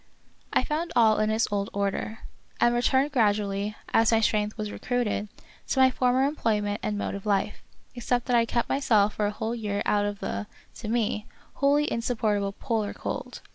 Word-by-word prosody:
I -, -, +2 dB
found 330 Hz, +2 st, -2 dB
all 220 Hz, -3 st, +5 dB
in 215 Hz, 0 st, +2 dB
its 220 Hz, +1 st, +1 dB
old 200 Hz, -1 st, -1 dB
order, 200 Hz, +2 st, -2 dB, 0.4 s
and 240 Hz, -, +4 dB
returned 265 Hz, +4 st, +2 dB
gradually, 205 Hz, -4 st, +1 dB, 0.2 s
as 225 Hz, 0 st, +4 dB
my 225 Hz, -, +4 dB
strength 210 Hz, -1 st, 0 dB
was 210 Hz, -1 st, -4 dB
recruited, 235 Hz, -4 st, -2 dB, 0.4 s
to 265 Hz, -, 0 dB
my 260 Hz, 0 st, +6 dB
former 255 Hz, +1 st, +2 dB
employment 215 Hz, -7 st, 0 dB
and 210 Hz, -1 st, -2 dB
mode -, -, -2 dB
of 200 Hz, +1 st, -6 dB
life, 205 Hz, 0 st, 0 dB, 0.3 s
except 245 Hz, 0 st, -1 dB
that 250 Hz, -, +1 dB
I 230 Hz, -1 st, +3 dB
kept 235 Hz, 0 st, 0 dB
myself 215 Hz, -7 st, +2 dB
for 210 Hz, -, 0 dB
a -, -, -1 dB
whole 220 Hz, +2 st, -3 dB
year 205 Hz, -3 st, -2 dB
out 205 Hz, 0 st, +2 dB
of 205 Hz, 0 st, -4 dB
the, 100 Hz, -, -4 dB, 0.3 s
to 225 Hz, -, -7 dB
me, 220 Hz, -1 st, -1 dB, 0.3 s
wholly 285 Hz, +1 st, +3 dB
insupportable 215 Hz, -4 st, 0 dB
polar 220 Hz, -3 st, -2 dB
cold. -, -, -5 dB
220 Hz, 180 wpm, -27 LUFS, 205-245 Hz, 0.4 s, my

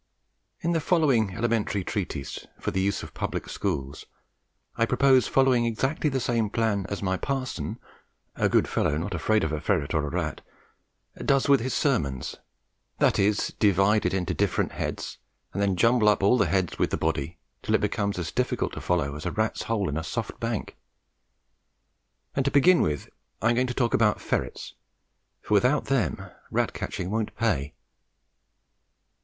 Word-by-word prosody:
In 170 Hz, -, 0 dB
the 165 Hz, -, +2 dB
following 135 Hz, -, +2 dB
elementary 110 Hz, -4 st, 0 dB
treatise 90 Hz, -9 st, -4 dB
for -, -, -2 dB
the 95 Hz, -, 0 dB
use 100 Hz, +1 st, 0 dB
of -, -, -9 dB
public -, -, -3 dB
schools, 70 Hz, -8 st, -3 dB, 0.7 s
I 115 Hz, -, +2 dB
propose 130 Hz, 0 st, +4 dB
following 130 Hz, -3 st, +3 dB
exactly 130 Hz, +7 st, 0 dB
the 135 Hz, -1 st, -1 dB
same 115 Hz, -3 st, 0 dB
plan 105 Hz, -3 st, 0 dB
as 100 Hz, 0 st, -4 dB
my 95 Hz, -1 st, 0 dB
parson 135 Hz, +1 st, -3 dB, 0.6 s
(a -, -, +1 dB
good -, -, +3 dB
fellow 75 Hz, -, 0 dB
not 90 Hz, +5 st, -3 dB
afraid 110 Hz, +5 st, +1 dB
of 80 Hz, -, -1 dB
a 75 Hz, -1 st, -2 dB
ferret 80 Hz, -4 st, 0 dB
or 75 Hz, -1 st, +1 dB
a -, -, -3 dB
rat) 80 Hz, -2 st, -3 dB, 0.8 s
does 135 Hz, -1 st, +2 dB
with 140 Hz, -1 st, +6 dB
his 130 Hz, +3 st, -2 dB
sermons 70 Hz, -, 0 dB, 0.6 s
that -, -, +3 dB
is, 100 Hz, +1 st, +2 dB
divide 100 Hz, +1 st, +4 dB
it -, -, -1 dB
into 95 Hz, -2 st, -1 dB
different -, -, 0 dB
heads, -, -, -4 dB, 0.3 s
and 100 Hz, -, -2 dB
then 100 Hz, -2 st, +2 dB
jumble 115 Hz, +2 st, +4 dB
up 105 Hz, -2 st, +2 dB
all 100 Hz, +5 st, +5 dB
the -, -, +3 dB
heads 95 Hz, -3 st, 0 dB
with -, -, +2 dB
the -, -, -1 dB
body, 80 Hz, +1 st, -2 dB, 0.2 s
till -, -, +1 dB
it -, -, +2 dB
becomes 100 Hz, -2 st, -1 dB
as 85 Hz, -3 st, -3 dB
difficult -, -, -1 dB
to -, -, -6 dB
follow 75 Hz, -6 st, 0 dB
as 75 Hz, -, -5 dB
a -, -, -1 dB
rat's 110 Hz, +1 st, -1 dB
hole 105 Hz, -4 st, -1 dB
in 75 Hz, -, -2 dB
a 80 Hz, -, -2 dB
soft 115 Hz, +6 st, -4 dB
bank; 115 Hz, -2 st, -3 dB, 1.6 s
and, 135 Hz, -, +2 dB
to 140 Hz, -, +2 dB
begin 155 Hz, +6 st, +5 dB
with, 75 Hz, -2 st, -1 dB, 0.3 s
I 110 Hz, -, +2 dB
am 120 Hz, -, +3 dB
going 125 Hz, +1 st, +2 dB
to 120 Hz, -, -4 dB
talk 120 Hz, -3 st, +1 dB
about 105 Hz, -2 st, +3 dB
ferrets, -, -, -3 dB, 0.7 s
for -, -, -2 dB
without 125 Hz, +8 st, +3 dB
them 125 Hz, -11 st, 0 dB, 0.3 s
rat -, -, 0 dB
catching 90 Hz, -, -4 dB
won't 110 Hz, -1 st, -2 dB
pay. 75 Hz, -11 st, 0 dB
105 Hz, 175 wpm, -26 LUFS, 90-120 Hz, 1.6 s, with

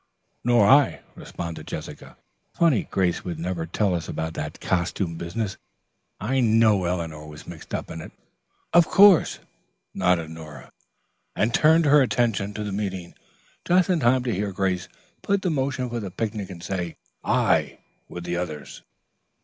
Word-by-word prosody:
"Nor 120 Hz, -3 st, +4 dB
I," 140 Hz, +2 st, +5 dB
responded 85 Hz, -1 st, -7 dB
Jessica. -, -, -8 dB, 0.4 s
"Funny 160 Hz, -, +2 dB
Grace 90 Hz, -3 st, 0 dB
would 85 Hz, -3 st, -5 dB
never 85 Hz, 0 st, -3 dB
tell 95 Hz, +2 st, 0 dB
us 85 Hz, -2 st, -3 dB
about 80 Hz, 0 st, -3 dB
that 75 Hz, -1 st, -5 dB
costume 85 Hz, 0 st, -1 dB
business. 95 Hz, +5 st, -4 dB, 0.6 s
I 130 Hz, +5 st, 0 dB
know 110 Hz, -5 st, +4 dB
Eleanor 80 Hz, -3 st, -3 dB
was 75 Hz, 0 st, -11 dB
mixed -, -, -11 dB
up -, -, -5 dB
in 80 Hz, -, -6 dB
it." -, -, -10 dB, 0.6 s
"Of 170 Hz, -1 st, +6 dB
course," 200 Hz, -3 st, +6 dB, 0.6 s
nodded 85 Hz, -3 st, +1 dB
Nora, 80 Hz, -2 st, -11 dB, 0.6 s
and 115 Hz, +2 st, +1 dB
turned 160 Hz, +1 st, +5 dB
her 145 Hz, 0 st, +6 dB
attention 110 Hz, -5 st, 0 dB
to 105 Hz, -, -3 dB
the 105 Hz, -, -4 dB
meeting 95 Hz, -3 st, -4 dB, 0.5 s
just 180 Hz, +1 st, +3 dB
in 175 Hz, -, +2 dB
time 125 Hz, -1 st, +3 dB
to 120 Hz, -3 st, -1 dB
hear 100 Hz, +1 st, -2 dB
Grace 95 Hz, -2 st, -1 dB, 0.3 s
put 200 Hz, -1 st, 0 dB
the 180 Hz, -, +1 dB
motion 135 Hz, -3 st, -1 dB
for 120 Hz, 0 st, -4 dB
the 100 Hz, -4 st, -5 dB
picnic 105 Hz, 0 st, -4 dB
and 85 Hz, -3 st, -9 dB
say 90 Hz, -3 st, -4 dB, 0.3 s
"aye" -, -, +2 dB, 0.3 s
with 85 Hz, -, -7 dB
the 85 Hz, 0 st, -2 dB
others. 80 Hz, -4 st, -6 dB
100 Hz, 155 wpm, -24 LUFS, 85-125 Hz, 0.6 s, Of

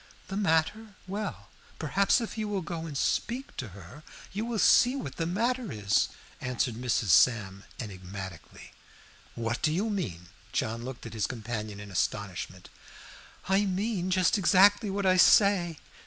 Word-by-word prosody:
"The 195 Hz, -, -4 dB
matter? 200 Hz, +3 st, 0 dB
Well, 200 Hz, +2 st, -5 dB, 0.3 s
perhaps 195 Hz, -, +2 dB
if 230 Hz, -, -5 dB
you 215 Hz, -1 st, -2 dB
will 200 Hz, -3 st, -2 dB
go 165 Hz, -1 st, -5 dB
and 145 Hz, -3 st, -5 dB
speak 250 Hz, -, -1 dB
to 125 Hz, -, -4 dB
her, 100 Hz, -, -12 dB, 0.3 s
you 210 Hz, +3 st, -2 dB
will 235 Hz, -1 st, -2 dB
see 245 Hz, +4 st, +5 dB
what 200 Hz, -, -6 dB
the 165 Hz, -, -1 dB
matter 235 Hz, +5 st, -1 dB
is," 105 Hz, -2 st, +1 dB, 0.3 s
answered 125 Hz, -1 st, -1 dB
Mrs. 120 Hz, -3 st, -1 dB
Sam, 100 Hz, -2 st, +3 dB
enigmatically. 95 Hz, -4 st, -8 dB, 0.6 s
"What 115 Hz, +1 st, -2 dB
do 155 Hz, -, +2 dB
you 200 Hz, +7 st, 0 dB
mean?" 90 Hz, -, -4 dB, 0.2 s
John 115 Hz, +1 st, -1 dB
looked 130 Hz, -1 st, -7 dB
at 115 Hz, -, -7 dB
his 110 Hz, -2 st, -1 dB
companion 110 Hz, -3 st, -5 dB
in 105 Hz, -1 st, -9 dB
astonishment. 90 Hz, -1 st, -3 dB, 0.8 s
"I 195 Hz, +2 st, +3 dB
mean 190 Hz, -1 st, -1 dB
just 185 Hz, +2 st, +3 dB
exactly 200 Hz, +3 st, +5 dB
what 200 Hz, 0 st, -2 dB
I 185 Hz, 0 st, +4 dB
say. 180 Hz, -4 st, +5 dB
160 Hz, 155 wpm, -29 LUFS, -, 0.8 s, see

